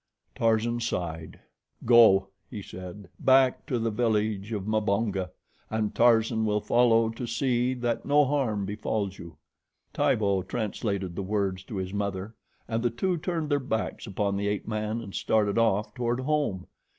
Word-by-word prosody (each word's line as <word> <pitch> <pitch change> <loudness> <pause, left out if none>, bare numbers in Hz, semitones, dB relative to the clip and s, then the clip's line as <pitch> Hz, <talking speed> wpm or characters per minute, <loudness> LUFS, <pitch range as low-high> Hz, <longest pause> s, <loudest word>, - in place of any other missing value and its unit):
Tarzan 115 +1 +1
sighed. 85 -8 -4 0.5
"Go," 110 -5 +6 0.2
he 105 -5 -7
said, 90 +2 -9
"back 130 -1 +3
to 125 - 0
the 115 -1 -1
village 105 -2 0
of 100 -3 -3
Mbonga, 105 -3 0 0.4
and 110 -1 -1
Tarzan 115 -1 +3
will 105 -1 +1
follow 115 0 +3
to 115 +2 -5
see 125 +1 0
that 120 -2 -2
no 145 0 +4
harm 125 -8 0
befalls 100 -1 -3
you." 85 -3 -11 0.6
Tibo 100 -3 +2
translated 100 -3 -3
the - - -3
words 95 -2 -1
to 110 - -7
his 95 0 -4
mother, 100 +1 -3 0.3
and 115 0 -1
the 120 - +2
two 175 +11 -1
turned 160 -2 -3
their 145 - +3
backs 115 -3 -3
upon 100 0 -1
the 100 +1 -1
ape 105 0 -2
man 110 +1 -2
and 100 -4 -9
started 105 0 +1
off 105 -1 +1
toward 120 +2 -1
home. 140 -10 -1
110 Hz, 155 wpm, -27 LUFS, 100-120 Hz, 0.6 s, Go